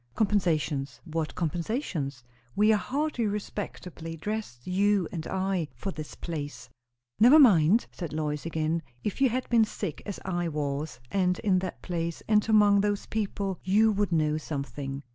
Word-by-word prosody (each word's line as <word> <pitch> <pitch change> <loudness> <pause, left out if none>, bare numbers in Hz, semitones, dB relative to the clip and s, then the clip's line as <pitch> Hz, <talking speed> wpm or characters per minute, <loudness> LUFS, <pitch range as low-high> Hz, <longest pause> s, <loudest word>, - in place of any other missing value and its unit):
"Compensations! 160 -10 0
What 160 -2 -3
compensations? 165 - -2 0.3
We 215 +2 +5
are - - +5
hardly 260 +1 -1
respectably 180 -5 -5
dressed, 205 - -5
you 195 0 +2
and 165 -3 -5
I, 190 -3 -1
for 195 - -4
this 155 -4 -8
place." 145 -6 -6 0.5
"Never 250 +7 +8
mind!" 210 - +6
said 170 -4 -6
Lois 150 -1 -2
again. 160 0 -1 0.2
"If 210 +6 -3
you 265 - +6
had 255 +2 -2
been 235 -2 +5
sick 200 -6 -4
as 200 - -4
I 175 -2 -1
was, 145 -3 -3
and 180 -2 +2
in 195 -4 +2
that 185 -1 -6
place, 170 -2 -3
and 215 0 +3
among 205 -2 +6
those 205 0 0
people, 200 -3 -2
you 215 +4 +4
would 205 -2 0
know 155 -2 +2
something." 140 -2 -5
180 Hz, 155 wpm, -28 LUFS, 155-210 Hz, 0.5 s, Never